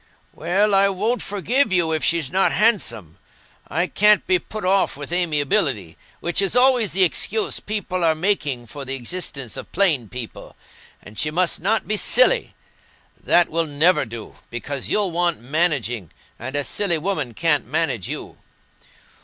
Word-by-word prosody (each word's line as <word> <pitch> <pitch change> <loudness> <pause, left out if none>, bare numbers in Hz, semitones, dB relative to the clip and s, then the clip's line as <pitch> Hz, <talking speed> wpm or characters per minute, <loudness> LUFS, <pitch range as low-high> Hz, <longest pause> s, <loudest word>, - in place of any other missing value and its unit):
"Well, 195 +6 +1
I 195 0 +4
won't 215 +6 -1
forgive 220 - 0
you 175 -3 +2
if 160 -1 -1
she's 165 -5 +1
not 190 +2 +2
handsome. 190 - +1 0.5
I 175 +2 -1
can't 210 +2 +3
be 185 -1 +3
put 215 +2 -7
off 190 -5 +2
with 145 +2 -8
amiability, 145 - 0 0.3
which 175 +3 0
is 195 +3 +1
always 250 -4 +4
the 190 +1 +4
excuse 210 +4 0
people 195 -4 -3
are 160 -1 +3
making 155 -8 -1
for 140 +5 -8
the 135 0 -4
existence 135 - -6
of - - -9
plain 160 - +1
people. 125 -3 -8 0.5
And 105 +1 -11
she 150 - 0
must 175 +3 0
not 215 +5 0
be 215 - -1
silly; - - +3 0.7
that 175 -1 +4
will 165 0 -1
never 155 +5 +2
do, 115 -2 -9
because 135 +4 -5
you'll 205 -4 +2
want 170 0 0
managing, 125 - -1 0.3
and 130 +4 -6
a 145 - 0
silly 185 +2 +1
woman 155 - -2
can't - - +1
manage - - -2
you. - - -7
175 Hz, 160 wpm, -21 LUFS, 140-200 Hz, 0.7 s, I